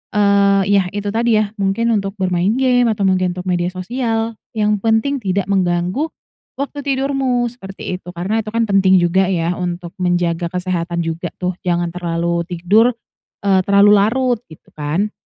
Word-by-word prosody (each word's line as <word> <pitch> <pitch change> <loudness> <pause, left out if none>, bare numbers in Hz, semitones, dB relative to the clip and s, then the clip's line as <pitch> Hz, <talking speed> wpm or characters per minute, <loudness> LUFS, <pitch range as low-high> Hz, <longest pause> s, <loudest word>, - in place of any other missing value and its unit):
eee, 200 -1 +4 0.2
yah 185 - -1
itu 205 0 -2
tadi 225 -1 +2
ya, 205 - -6
mungkin 200 +4 +1
untuk 195 -2 -1
bermain 185 +1 0
game, 250 -2 +3
atau 215 -2 0
mungkin 185 -2 +1
untuk 180 - -5
media 175 -1 0
sosial, 225 +3 -2 0.2
yang 210 -1 +1
penting, 225 +6 +1
tidak 195 -2 -1
mengganggu 180 - 0 0.5
waktu 285 +1 -5
tidurmu, 265 -3 0
seperti 195 -5 -7
itu. - - -23
Karena 190 +6 -1
itu 215 - -5
kan 230 +1 +1
penting 195 -3 +4
juga 180 +2 +2
ya, 175 -2 0
untuk 175 -1 -4
menjaga 175 -1 0
kesehatan 175 -1 -2
juga 165 +1 -3
tuh. 180 0 -2 0.2
Jangan 175 -1 0
terlalu 170 0 -2
tidur, 205 +7 +2 0.5
eee, 195 -1 +3
terlalu 200 +1 +6
larut, 245 +3 +1
gitu 155 - -17
kan. 160 +8 -2
195 Hz, 160 wpm, -18 LUFS, 175-225 Hz, 0.5 s, terlalu